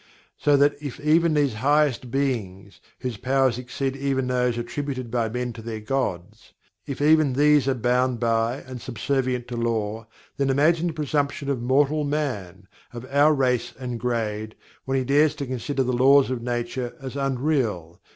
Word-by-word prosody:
So 145 -1 +3
that 145 +1 +4
if 145 -1 -6
even 155 +2 +3
these 145 -4 +2
highest 135 +2 +1
Beings, 110 -8 -3 0.2
whose 125 -4 -4
powers 130 +1 +1
exceed 130 +2 -3
even 135 -1 -1
those 125 -1 0
attributed 130 +1 -4
by 115 -2 0
men 125 +1 -3
to 115 - -9
their 110 -1 -5
gods 105 -7 -4 0.3
if 140 +1 -3
even 155 -2 +4
these 145 0 +4
are 135 - +2
bound 125 +1 +1
by 115 0 +1
and 130 -1 -8
are - - -10
subservient 125 +1 -2
to 120 - -4
Law, 110 -1 -2 0.3
then 140 -1 +1
imagine 160 +5 +3
the 165 - -2
presumption 145 -2 -1
of 130 -4 -2
mortal 145 +4 +2
man, 105 - -3 0.2
of 120 +1 -8
our 145 +2 +5
race 125 -3 0
and 125 -2 -5
grade, 110 -3 -2 0.3
when 135 0 0
he 130 - +1
dares 145 +3 +3
to 140 -1 -4
consider 130 +2 -2
the 125 0 -1
Laws 135 +2 +5
of 125 -2 -3
Nature 120 +1 -3
as 135 -1 -7
"unreal!" 130 - -1
130 Hz, 170 wpm, -24 LUFS, 120-140 Hz, 0.3 s, our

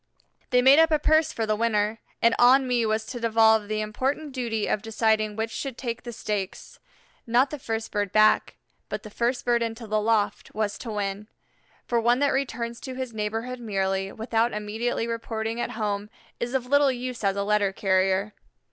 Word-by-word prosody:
They 250 0 +3
made 270 +4 +7
up 325 0 +6
a 310 - +3
purse 315 +1 +3
for 225 - -2
the 215 0 +1
winner, 215 -1 0 0.2
and 230 0 +5
on 260 +2 +6
me 240 -2 +1
was 220 0 0
to 245 +2 -6
devolve 220 -2 +4
the 215 0 -1
important 265 +8 -2
duty 235 -5 -2
of 210 - 0
deciding 220 -1 0
which 225 +1 -2
should 270 -1 -5
take 240 -2 -4
the 240 - -7
stakes. 205 -4 -5 0.5
Not 245 +4 +3
the 300 - -5
first 225 -2 -4
bird 205 -2 -1
back, 215 0 +4 0.3
but - - -4
the 215 - -10
first 240 +3 -1
bird 240 -1 +2
into 230 0 -3
the 215 0 0
loft, 215 -1 0
was 210 -1 -2
to 235 - -7
win, 205 -1 -3 0.6
for 235 -1 +1
one 240 +2 +3
that 285 +1 +2
returns 235 -3 -2
to 260 -1 -7
his 255 -2 -5
neighborhood 225 +4 -3
merely, 195 -3 -1
without 225 +1 0
immediately 215 +3 -2
reporting 230 0 -3
at - - -3
home, 205 -1 -2 0.3
is 240 +2 -3
of 255 -2 0
little 285 +1 +4
use 250 -2 -5
as 195 -1 +2
a 200 - -1
letter 205 -1 +2
carrier. 190 +1 +1
225 Hz, 190 wpm, -25 LUFS, 210-245 Hz, 0.6 s, made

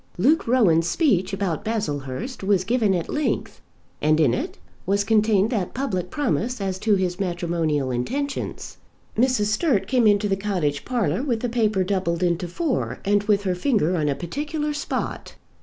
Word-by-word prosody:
Luke 280 - +3
Rowan's 175 -10 +3
speech 195 - +2
about 195 -1 -2
Baslehurst 205 - -3
was 195 -2 +2
given 220 -3 +2
at 170 - -2
length, 295 0 -2 0.4
and 155 +1 +3
in 140 -7 +4
it - - -3 0.3
was 200 +1 +2
contained 215 0 +3
that 200 -7 -2
public 225 -10 -2
promise 250 -4 -1
as 190 -2 -2
to 210 0 +3
his 185 -1 -1
matrimonial 170 -6 -1
intentions. 275 - -3 0.4
Mrs. 245 -2 +2
Sturt 240 - +1
came 250 -4 +3
into 205 0 +3
the 195 - +1
cottage 180 -8 -2
parlour 245 -1 0
with 245 -6 -1
the 245 - -1
paper 215 -5 +1
doubled 185 -3 -1
into 175 0 0
four, 280 - -2
and 205 +1 +3
with 205 -1 +2
her 185 -2 0
finger 185 - +1
on 150 -3 0
a 140 - 0
particular 300 - -3
spot. 295 +2 -4
200 Hz, 165 wpm, -23 LUFS, 175-245 Hz, 0.4 s, in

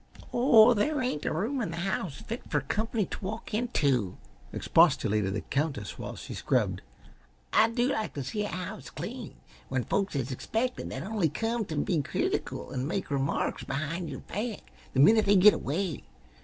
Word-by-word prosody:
"Oh, 240 -2 +7
there 290 +8 +1
ain't 250 - -1
a - - +1
room 225 - -1
in 210 - -2
the 165 - -5
house 180 -5 -2
fit 230 +2 -5
fer 145 - +1
comp'ny 215 - -1
t' - - -6
walk 215 +3 -5
into," 140 - +1 0.3
expostulated 110 - +3
the - - -2
Countess 140 -7 -2
while - - -5
she - - -8
scrubbed. - - 0 0.7
"I 220 +1 +6
do 240 +2 +1
like 220 -4 -2
t' 140 - -3
see 210 +11 -2
a - - -2
house 185 -2 -6
clean - - -7 0.3
when 130 -2 0
folks 195 - -1
is 135 -1 -1
expected 225 - -2
that - - -5
only 195 -5 0
come 225 +5 -1
t' 160 - -5
be 155 +2 +1
critical - - -2
an' 130 +1 -2
make 190 -1 -3
remarks 140 0 0
behind 155 +5 -3
yer 135 - -5
back 215 +3 -5 0.2
the - - +2
minit 215 +8 +6
they 205 - +6
git 200 +3 +8
away. 165 +3 -2
185 Hz, 180 wpm, -29 LUFS, 140-220 Hz, 0.7 s, git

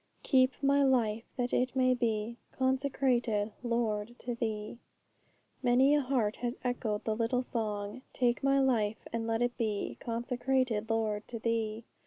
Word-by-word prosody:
'Keep 260 -1 +4
my 280 +1 +4
life, 235 -5 +2
that 245 -1 -1
it 255 +1 +1
may 255 -1 +4
be 230 -1 -1 0.2
Consecrated, 260 -5 +1
Lord, 235 -1 -1
to 245 - -4
Thee.' 220 -1 -3 0.8
Many 255 +3 +4
a 295 - +4
heart 250 -6 0
has 240 0 -3
echoed 235 -4 -1
the 220 - 0
little 235 +3 0
song: 215 -1 -3
'Take 240 -1 +1
my 275 0 +4
life, 225 -6 +1
and 230 -1 -2
let 225 +1 +1
it 245 0 0
be 215 -3 -2
Consecrated, 240 -1 -1
Lord, 220 -2 0
to 235 - -5
Thee!' 225 -1 -1
235 Hz, 150 wpm, -31 LUFS, 220-255 Hz, 0.8 s, Keep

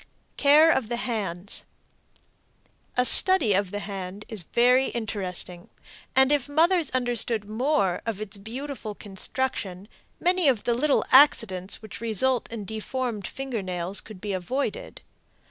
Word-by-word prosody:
CARE 300 +3 +6
OF 250 -8 0
THE 240 - -1
HANDS. 200 -6 -4 1.3
A 250 - +3
study 290 - +5
of 195 0 +1
the 205 - -5
hand 195 0 -7
is 220 -4 -4
very 250 +8 +3
interesting, 190 -3 -5 0.5
and 265 +1 +5
if 290 -1 +1
mothers 330 +2 +3
understood 240 -4 0
more 220 -4 0
of 220 -3 -2
its 215 -1 -4
beautiful 235 +1 -6
construction 200 -2 -4 0.3
many 360 -2 +2
of 250 -6 +2
the 240 - +1
little 280 +4 +1
accidents 220 -9 +4
which 215 - -9
result 235 +3 +1
in 220 -3 -6
deformed 220 0 -4
finger 265 -5 -4
nails 185 +1 -1
could 210 -4 -12
be 205 +1 -4
avoided. 265 - -4
225 Hz, 135 wpm, -26 LUFS, 200-265 Hz, 1.3 s, CARE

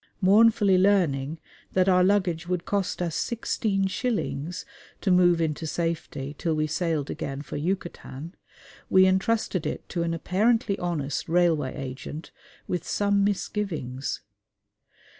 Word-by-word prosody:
Mournfully 205 -1 +5
learning 165 -7 +2 0.4
that 185 0 +3
our 180 -1 +5
luggage 180 -4 +1
would 180 -1 -2
cost 195 -3 -1
us 170 -2 -2
sixteen 215 -4 -1
shillings 190 - -2 0.4
to 195 - +1
move 175 -1 +5
into 160 0 -1
safety 160 -4 -3
till 165 -2 0
we 155 0 +1
sailed 155 -2 -1
again 140 0 -4
for - - -7
Yucatan, 170 -2 -4 0.6
we 190 0 +6
entrusted 190 -1 +1
it - - -5
to 175 - -2
an 165 0 0
apparently 205 +5 +1
honest 155 -6 -2
Railway 165 -6 +2
Agent 135 +4 -7 0.4
with 175 -2 -2
some 200 +1 +1
misgivings. 185 -10 -2
175 Hz, 125 wpm, -26 LUFS, 155-195 Hz, 0.6 s, we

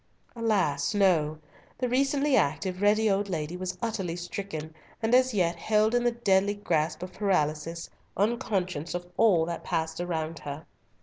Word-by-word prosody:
Alas! 205 -9 +1
no; 165 -6 +3 0.4
the 250 - -1
recently 275 +3 +2
active, 180 - 0
ready 215 +2 +4
old 200 0 +1
lady 160 -1 -3
was 185 0 -4
utterly 195 -7 -2
stricken, 175 -3 -6 0.3
and 225 +1 0
as 255 +1 +5
yet 175 -5 +1
held 215 +5 +2
in 245 0 +2
the 240 - +3
deadly 205 -3 +2
grasp 160 -5 -1
of 185 0 -7
paralysis, 165 -4 -1 0.3
unconscious 190 - -1
of 175 0 -4
all 190 -8 +4
that 170 0 -5
passed 160 -1 -2
around 165 -2 -3
her. 145 +3 -7
185 Hz, 150 wpm, -28 LUFS, 165-215 Hz, 0.4 s, as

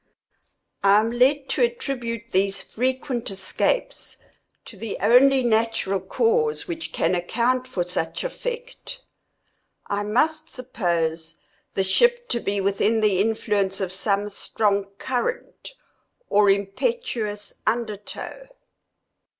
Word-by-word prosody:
I 200 +1 +6
am 225 +2 0
led 265 +3 +3
to - - 0
attribute 255 - -1
these 195 +1 +1
frequent 255 0 -2
escapes 195 - -2 0.5
to - - -11
the 225 -3 -5
only 260 +3 +5
natural 225 -4 +1
cause 455 - +1
which 330 -2 -5
can 165 +3 +1
account 240 +8 0
for 190 -8 -1
such 175 -2 -2
effect. - - -6 0.8
I 200 0 -2
must 255 +10 +1
suppose 170 -10 -2 0.4
the 195 - +2
ship 480 - +3
to 240 - +1
be 200 -2 -1
within 200 +3 +1
the 200 -3 +3
influence 205 -3 0
of 185 -2 -2
some 200 +1 0
strong 200 0 0
current, 475 - -3 0.5
or 205 0 +5
impetuous 210 - -1
under 220 -1 0
tow. 210 - -8
225 Hz, 115 wpm, -24 LUFS, 200-275 Hz, 0.8 s, I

